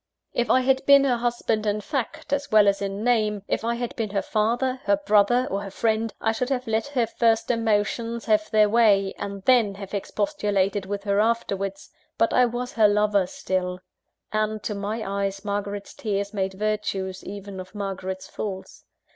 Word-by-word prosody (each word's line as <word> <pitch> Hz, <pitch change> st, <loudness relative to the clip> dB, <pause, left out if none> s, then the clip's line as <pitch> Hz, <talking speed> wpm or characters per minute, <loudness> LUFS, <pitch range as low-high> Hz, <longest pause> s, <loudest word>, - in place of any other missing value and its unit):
If 240 Hz, -, 0 dB
I 255 Hz, -, +5 dB
had 265 Hz, +1 st, +2 dB
been 280 Hz, -1 st, +8 dB
her 255 Hz, -3 st, +2 dB
husband 235 Hz, -2 st, -1 dB
in 205 Hz, 0 st, +1 dB
fact, 290 Hz, +5 st, -4 dB
as 285 Hz, 0 st, -1 dB
well 215 Hz, -1 st, +6 dB
as 200 Hz, 0 st, +2 dB
in 200 Hz, +1 st, -3 dB
name; 215 Hz, -4 st, +1 dB
if -, -, -1 dB
I 235 Hz, +1 st, 0 dB
had 240 Hz, 0 st, -4 dB
been 225 Hz, -2 st, -2 dB
her 195 Hz, 0 st, -1 dB
father, 240 Hz, +4 st, 0 dB
her 200 Hz, 0 st, +3 dB
brother, 210 Hz, +5 st, +3 dB
or 200 Hz, -, -1 dB
her 200 Hz, -, -6 dB
friend, 220 Hz, +2 st, 0 dB
I 225 Hz, -, +1 dB
should 250 Hz, +3 st, -2 dB
have 255 Hz, -2 st, -1 dB
let 225 Hz, +3 st, 0 dB
her 260 Hz, -5 st, +1 dB
first 225 Hz, +1 st, +1 dB
emotions 230 Hz, +1 st, 0 dB
have 215 Hz, -1 st, +2 dB
their 215 Hz, -1 st, +5 dB
way, 205 Hz, -3 st, +3 dB
and 200 Hz, -1 st, -5 dB
then 230 Hz, -5 st, +4 dB
have 195 Hz, 0 st, -9 dB
expostulated 200 Hz, -1 st, -1 dB
with 200 Hz, 0 st, -4 dB
her 200 Hz, 0 st, +1 dB
afterwards. 200 Hz, -3 st, -1 dB, 0.3 s
But 230 Hz, -, +2 dB
I 250 Hz, -, +5 dB
was 245 Hz, +1 st, -4 dB
her 220 Hz, -2 st, +5 dB
lover 205 Hz, -2 st, +2 dB
still; 180 Hz, -1 st, -2 dB, 0.6 s
and, 215 Hz, 0 st, -1 dB
to 210 Hz, -, -2 dB
my 210 Hz, +2 st, -3 dB
eyes, 195 Hz, 0 st, -2 dB
Margaret's 205 Hz, 0 st, -3 dB
tears 200 Hz, -1 st, -3 dB
made 190 Hz, -2 st, -2 dB
virtues 195 Hz, -2 st, -2 dB
even 200 Hz, -1 st, -7 dB
of 185 Hz, +3 st, -10 dB
Margaret's 190 Hz, -2 st, -4 dB
faults. 190 Hz, -3 st, -7 dB
210 Hz, 185 wpm, -24 LUFS, 200-230 Hz, 0.6 s, been